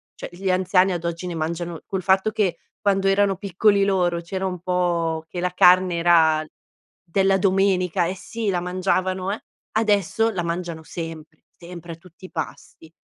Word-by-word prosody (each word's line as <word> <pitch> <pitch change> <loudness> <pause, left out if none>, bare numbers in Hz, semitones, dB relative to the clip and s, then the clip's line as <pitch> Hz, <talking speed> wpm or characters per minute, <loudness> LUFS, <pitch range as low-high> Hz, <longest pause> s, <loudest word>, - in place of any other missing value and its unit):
cioè - - -7
gli 185 +2 -2
anziani 185 +1 +3
ad 175 -2 -3
oggi 170 +1 -3
ne 175 - -4
mangiano 165 +1 -4
col 190 -1 -4
fatto 190 +3 +3
che 200 -5 0 0.2
quando 195 -2 +1
erano 195 0 +3
piccoli 200 +1 +2
loro 180 -3 +1
c'era 190 +3 -4
un 180 -1 -3
po' 170 -2 -1
che 175 - -6
la 180 +1 -1
carne 180 0 +5
era 160 -2 +4 0.6
della 195 +2 +2
domenica 185 -2 +2
eh 185 - -3
sì, 220 +3 -4
la 180 -2 0
mangiavano, 185 +1 -1
eh, 210 - -4 0.3
adesso 215 0 +2
la 190 -4 -2
mangiano 170 -1 -4
sempre, 160 -1 -8
sempre 170 -1 -10
a - - -9
tutti 175 +2 -16
i - - -12
pasti. 160 -1 -7
180 Hz, 170 wpm, -23 LUFS, 170-195 Hz, 0.6 s, carne